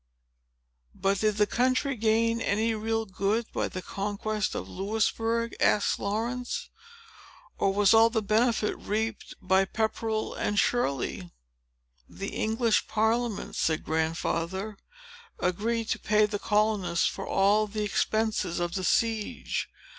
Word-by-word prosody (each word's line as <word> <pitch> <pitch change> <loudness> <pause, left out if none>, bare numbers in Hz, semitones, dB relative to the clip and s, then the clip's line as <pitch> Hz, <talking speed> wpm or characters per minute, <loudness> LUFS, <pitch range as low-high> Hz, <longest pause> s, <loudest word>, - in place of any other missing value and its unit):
"But, 195 0 0
did 215 -1 +1
the 210 - +4
country 255 +4 +1
gain 230 +1 +2
any 220 +3 +1
real 225 +1 -1
good 200 +4 -1
by - - 0
the 185 - -6
conquest 205 +1 -2
of - - -4
Louisbourg?" 225 +3 -1
asked 205 - +2
Laurence. 235 +5 -3 0.9
"Or 195 - +3
was 200 0 +4
all 225 +1 +7
the 220 -2 -1
benefit 220 +1 +2
reaped 220 +1 -3
by 190 +1 +3
Pepperell 220 +1 -2
and 205 - -2
Shirley?" 140 - 0 0.8
"The 195 - -5
English 225 0 +1
Parliament," 220 0 0
said 160 -1 0
Grandfather, 165 +5 -2 0.6
"agreed 225 +5 -1
to - - 0
pay 210 0 +3
the 210 -1 -3
colonists 210 -5 +1
for 195 - -2
all 205 +2 +3
the 210 +1 -3
expenses 210 -3 0
of 175 0 -2
the 190 - -2
siege. 225 +2 0
215 Hz, 125 wpm, -28 LUFS, 195-225 Hz, 0.9 s, all